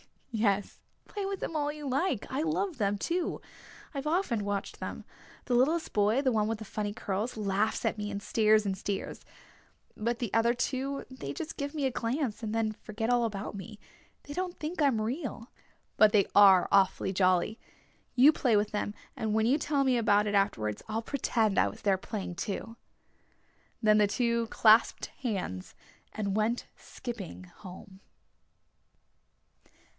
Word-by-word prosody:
"Yes, 205 Hz, -3 st, 0 dB, 0.3 s
play 405 Hz, -2 st, -5 dB
with 390 Hz, -1 st, -4 dB
them 325 Hz, -, -4 dB
all 295 Hz, -1 st, 0 dB
you 300 Hz, -1 st, -7 dB
like! 270 Hz, -, 0 dB
I 270 Hz, +3 st, -1 dB
love 325 Hz, +3 st, -1 dB
them, 205 Hz, -2 st, 0 dB
too. 340 Hz, -, -2 dB, 0.5 s
I've 280 Hz, +1 st, -4 dB
often 300 Hz, -, 0 dB
watched 205 Hz, -1 st, -3 dB
them. -, -, -6 dB, 0.4 s
The 250 Hz, -, -1 dB
littlest 300 Hz, +7 st, +2 dB
boy, 210 Hz, +5 st, +3 dB
the 265 Hz, -2 st, +2 dB
one 215 Hz, -2 st, +1 dB
with 225 Hz, 0 st, -1 dB
the 220 Hz, -, -8 dB
funny 205 Hz, 0 st, -3 dB
curls, 210 Hz, +3 st, -3 dB
laughs 210 Hz, +1 st, 0 dB
at -, -, 0 dB
me 205 Hz, 0 st, -3 dB
and 200 Hz, 0 st, -5 dB
stares 215 Hz, -1 st, +3 dB
and 195 Hz, -1 st, 0 dB
stares. 200 Hz, 0 st, -5 dB, 0.7 s
But 235 Hz, +2 st, -1 dB
the 235 Hz, -3 st, -4 dB
other 230 Hz, +1 st, +3 dB
two... 270 Hz, +2 st, -2 dB
they 185 Hz, -, -6 dB
just 320 Hz, -, -6 dB
give 285 Hz, +1 st, -4 dB
me 290 Hz, -3 st, 0 dB
a 265 Hz, -, +1 dB
glance 240 Hz, -1 st, -2 dB
and 220 Hz, -1 st, -3 dB
then 225 Hz, -1 st, +1 dB
forget 215 Hz, +1 st, -5 dB
all 240 Hz, -1 st, +3 dB
about 205 Hz, -2 st, -4 dB
me. 205 Hz, +2 st, -8 dB, 0.5 s
They 290 Hz, -, -8 dB
don't 360 Hz, +1 st, -3 dB
think 315 Hz, +2 st, -4 dB
I'm 265 Hz, -7 st, +3 dB
real. 245 Hz, 0 st, -4 dB, 0.5 s
But 215 Hz, -1 st, +6 dB
they 205 Hz, -2 st, +5 dB
are 195 Hz, -3 st, +7 dB
awfully 190 Hz, -1 st, +3 dB
jolly. 185 Hz, +3 st, +2 dB, 0.6 s
You 265 Hz, +4 st, +8 dB
play 250 Hz, -7 st, +1 dB
with 210 Hz, 0 st, +1 dB
them 210 Hz, 0 st, -2 dB, 0.2 s
and 220 Hz, -1 st, -2 dB
when 220 Hz, 0 st, +3 dB
you 265 Hz, +6 st, +3 dB
tell 290 Hz, -1 st, +1 dB
me 260 Hz, -2 st, +3 dB
about 210 Hz, -2 st, +3 dB
it 205 Hz, -, -1 dB
afterwards 115 Hz, -, 0 dB
I'll 220 Hz, +1 st, -2 dB
pretend 225 Hz, -6 st, +1 dB
I -, -, +4 dB
was 100 Hz, -, -8 dB
there 195 Hz, -2 st, +2 dB
playing 190 Hz, -2 st, -5 dB
too." 215 Hz, +6 st, -5 dB, 1.1 s
Then 215 Hz, 0 st, +5 dB
the 210 Hz, -, +5 dB
two 235 Hz, +1 st, 0 dB
clasped 220 Hz, 0 st, +4 dB
hands 190 Hz, -, -4 dB, 0.4 s
and 200 Hz, -2 st, -2 dB
went 225 Hz, +3 st, 0 dB
skipping 225 Hz, -8 st, -8 dB
home. 185 Hz, +1 st, -12 dB
220 Hz, 170 wpm, -30 LUFS, 205-260 Hz, 1.1 s, You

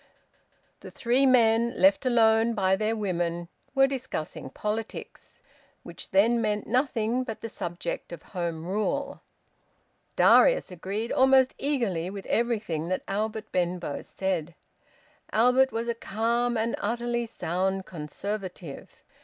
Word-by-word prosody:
The -, -, -10 dB
three 255 Hz, +3 st, +2 dB
men, 235 Hz, -1 st, +4 dB
left 285 Hz, -2 st, +4 dB
alone 225 Hz, -1 st, +4 dB
by 190 Hz, -2 st, +3 dB
their 215 Hz, +3 st, 0 dB
women, 175 Hz, -4 st, -2 dB, 0.3 s
were 270 Hz, 0 st, +6 dB
discussing 260 Hz, -, -4 dB
politics, 215 Hz, +8 st, -6 dB, 0.4 s
which -, -, -10 dB
then 230 Hz, +5 st, +3 dB
meant 210 Hz, -1 st, -1 dB
nothing 245 Hz, -1 st, 0 dB
but 225 Hz, -4 st, -6 dB
the 230 Hz, -, -5 dB
subject 175 Hz, -3 st, -5 dB
of 170 Hz, -2 st, -8 dB
Home 170 Hz, -2 st, -3 dB
Rule. 215 Hz, +9 st, -2 dB, 0.9 s
Darius -, -, +5 dB
agreed 195 Hz, +6 st, -4 dB
almost 265 Hz, 0 st, +5 dB
eagerly 225 Hz, -, -1 dB
with 195 Hz, 0 st, -7 dB
everything 215 Hz, -9 st, -1 dB
that 185 Hz, +1 st, -2 dB
Albert 215 Hz, +2 st, -3 dB
Benbow 175 Hz, -4 st, -1 dB
said. 175 Hz, -4 st, -3 dB, 0.8 s
Albert 250 Hz, +4 st, +4 dB
was 230 Hz, +1 st, -3 dB
a 235 Hz, -, +1 dB
calm 235 Hz, +2 st, 0 dB
and 225 Hz, +1 st, 0 dB
utterly 235 Hz, +2 st, -1 dB
sound 190 Hz, -1 st, -2 dB
Conservative. 180 Hz, 0 st, -6 dB
220 Hz, 120 wpm, -27 LUFS, 185-235 Hz, 0.9 s, were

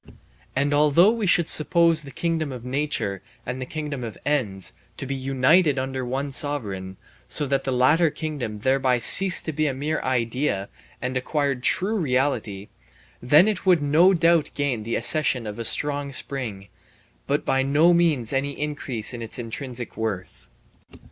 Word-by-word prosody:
And 140 Hz, +2 st, 0 dB
although 150 Hz, +7 st, +4 dB
we 225 Hz, -3 st, -2 dB
should 170 Hz, -2 st, +3 dB
suppose 165 Hz, +1 st, +3 dB
the 140 Hz, -, -9 dB
kingdom 160 Hz, +1 st, -2 dB
of 125 Hz, -2 st, -8 dB
nature 125 Hz, -8 st, -2 dB, 0.2 s
and 125 Hz, +2 st, -5 dB
the 130 Hz, -, -5 dB
kingdom 150 Hz, -4 st, -5 dB
of 115 Hz, -3 st, -7 dB
ends 100 Hz, -, -2 dB, 0.2 s
to -, -, -5 dB
be 140 Hz, -, -4 dB
united 135 Hz, +4 st, +2 dB
under 130 Hz, 0 st, -3 dB
one 135 Hz, +3 st, -3 dB
sovereign, 100 Hz, -11 st, -1 dB, 0.3 s
so 145 Hz, -, 0 dB
that 135 Hz, 0 st, -1 dB
the 135 Hz, -, -1 dB
latter 150 Hz, +7 st, +3 dB
kingdom 140 Hz, -10 st, -5 dB
thereby 130 Hz, 0 st, +2 dB
ceased 185 Hz, +9 st, +6 dB
to 160 Hz, -, -3 dB
be 155 Hz, +1 st, 0 dB
a 135 Hz, -, -2 dB
mere 150 Hz, +4 st, -2 dB
idea 120 Hz, -4 st, -1 dB, 0.3 s
and 130 Hz, +1 st, -3 dB
acquired 140 Hz, 0 st, -1 dB
true 195 Hz, -, +1 dB
reality, 125 Hz, -, -1 dB, 0.5 s
then 150 Hz, -, +5 dB
it 210 Hz, -3 st, -2 dB
would 175 Hz, -5 st, +4 dB
no 160 Hz, +6 st, +4 dB
doubt 170 Hz, -3 st, +2 dB
gain 140 Hz, -6 st, -1 dB
the 115 Hz, +2 st, -3 dB
accession 125 Hz, -1 st, +1 dB
of 105 Hz, +1 st, -7 dB
a -, -, -3 dB
strong 140 Hz, +4 st, -2 dB
spring, 115 Hz, -8 st, -3 dB, 0.6 s
but -, -, -1 dB
by 135 Hz, -, +1 dB
no 150 Hz, +6 st, +3 dB
means 155 Hz, -9 st, +1 dB
any 140 Hz, +1 st, -2 dB
increase 140 Hz, -7 st, -3 dB
of 120 Hz, -, -7 dB
its 115 Hz, -, -6 dB
intrinsic 120 Hz, 0 st, -6 dB
worth. 105 Hz, -5 st, -5 dB
135 Hz, 165 wpm, -23 LUFS, 120-150 Hz, 0.6 s, ceased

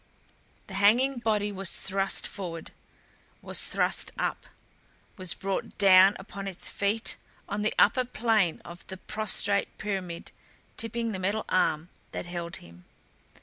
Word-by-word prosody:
The -, -, -11 dB
hanging 240 Hz, +6 st, +4 dB
body 210 Hz, -3 st, 0 dB
was 195 Hz, -2 st, -1 dB
thrust 195 Hz, 0 st, -1 dB
forward; 170 Hz, -5 st, -6 dB, 0.7 s
was -, -, +1 dB
thrust -, -, 0 dB
up; -, -, -2 dB, 0.7 s
was 185 Hz, -4 st, -2 dB
brought 195 Hz, 0 st, -3 dB
down 195 Hz, 0 st, +7 dB
upon 195 Hz, 0 st, -7 dB
its 190 Hz, -3 st, -3 dB
feet 205 Hz, +3 st, 0 dB, 0.3 s
on 205 Hz, +1 st, -2 dB
the 210 Hz, -, 0 dB
upper 255 Hz, -2 st, +5 dB
plane 220 Hz, -7 st, +1 dB
of 170 Hz, +1 st, -11 dB
the 190 Hz, -, -6 dB
prostrate 205 Hz, 0 st, 0 dB
pyramid 190 Hz, -5 st, -4 dB, 0.4 s
tipping 230 Hz, 0 st, 0 dB
the 190 Hz, -, -4 dB
metal 200 Hz, +4 st, -1 dB
arm 165 Hz, -2 st, +1 dB, 0.2 s
that -, -, -4 dB
held 175 Hz, -1 st, -4 dB
him. 85 Hz, +1 st, -12 dB
195 Hz, 135 wpm, -28 LUFS, 185-215 Hz, 0.7 s, down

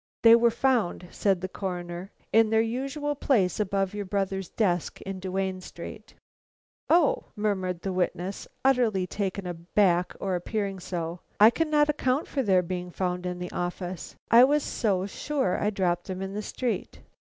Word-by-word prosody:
"They 230 Hz, 0 st, +9 dB
were 235 Hz, 0 st, +5 dB
found," 230 Hz, -8 st, 0 dB
said 195 Hz, -3 st, +1 dB
the 185 Hz, -, -2 dB
Coroner, 180 Hz, -1 st, -5 dB, 0.2 s
"in 225 Hz, 0 st, +5 dB
their 220 Hz, 0 st, +3 dB
usual 275 Hz, +5 st, -2 dB
place 220 Hz, -11 st, +1 dB
above 195 Hz, -1 st, 0 dB
your 205 Hz, 0 st, -3 dB
brother's 195 Hz, -1 st, -2 dB
desk 180 Hz, -7 st, 0 dB
in 195 Hz, -1 st, -5 dB
Duane 190 Hz, 0 st, -2 dB
Street." 185 Hz, +5 st, -10 dB, 0.7 s
"Oh!" 485 Hz, +9 st, +4 dB
murmured 190 Hz, -5 st, -1 dB
the 195 Hz, -, -2 dB
witness, 180 Hz, +1 st, -2 dB, 0.2 s
utterly 235 Hz, -8 st, +3 dB
taken 195 Hz, 0 st, -3 dB
aback 175 Hz, +1 st, +1 dB
or 195 Hz, -1 st, -2 dB
appearing 195 Hz, +2 st, -2 dB
so. 170 Hz, -1 st, -4 dB, 0.2 s
"I 215 Hz, +2 st, +9 dB
cannot 300 Hz, 0 st, +2 dB
account 285 Hz, -1 st, +1 dB
for 275 Hz, -, -1 dB
their 190 Hz, -6 st, +3 dB
being 180 Hz, 0 st, -4 dB
found 180 Hz, 0 st, -2 dB
in 180 Hz, 0 st, -3 dB
the 180 Hz, 0 st, -6 dB
office. 175 Hz, 0 st, -4 dB, 0.2 s
I 235 Hz, +2 st, +9 dB
was 290 Hz, +2 st, +3 dB
so 195 Hz, -5 st, 0 dB
sure 265 Hz, -1 st, -1 dB
I 205 Hz, -, +2 dB
dropped 180 Hz, -4 st, -1 dB
them 190 Hz, 0 st, -4 dB
in 195 Hz, 0 st, -5 dB
the 210 Hz, -, -3 dB
street." 220 Hz, -2 st, -3 dB
195 Hz, 160 wpm, -27 LUFS, 180-225 Hz, 0.7 s, They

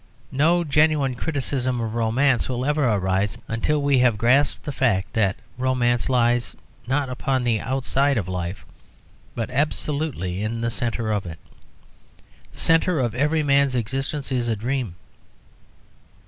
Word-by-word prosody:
No 165 Hz, +6 st, +3 dB
genuine 150 Hz, -3 st, +2 dB
criticism 130 Hz, -2 st, -2 dB
of 115 Hz, -1 st, -3 dB
romance 120 Hz, +4 st, +1 dB
will 125 Hz, 0 st, -2 dB
ever 150 Hz, 0 st, +1 dB
arise 95 Hz, -1 st, 0 dB
until 140 Hz, +6 st, 0 dB
we 140 Hz, -2 st, +3 dB
have 125 Hz, -4 st, +3 dB
grasped 130 Hz, +6 st, +2 dB
the 150 Hz, -, -4 dB
fact 110 Hz, -9 st, 0 dB
that 100 Hz, -4 st, +2 dB, 0.2 s
romance 125 Hz, -1 st, +1 dB
lies 120 Hz, -1 st, +1 dB, 0.3 s
not 135 Hz, +2 st, 0 dB
upon 130 Hz, 0 st, -1 dB
the 115 Hz, -3 st, +1 dB
outside 135 Hz, +2 st, 0 dB
of 95 Hz, -5 st, -2 dB
life, 90 Hz, 0 st, -4 dB, 0.7 s
but 115 Hz, -1 st, -3 dB
absolutely 140 Hz, -, -1 dB
in 110 Hz, +2 st, -2 dB
the 115 Hz, 0 st, -1 dB
centre 115 Hz, -2 st, -2 dB
of 100 Hz, -3 st, -1 dB
it. 80 Hz, -1 st, -7 dB, 1.1 s
The -, -, -13 dB
centre 165 Hz, 0 st, +3 dB
of 120 Hz, -4 st, 0 dB
every 150 Hz, +5 st, +1 dB
man's 140 Hz, -2 st, +3 dB
existence 135 Hz, +4 st, -2 dB
is 125 Hz, -2 st, 0 dB
a 115 Hz, -, +1 dB
dream. 120 Hz, -3 st, -3 dB
125 Hz, 145 wpm, -23 LUFS, 115-140 Hz, 1.1 s, No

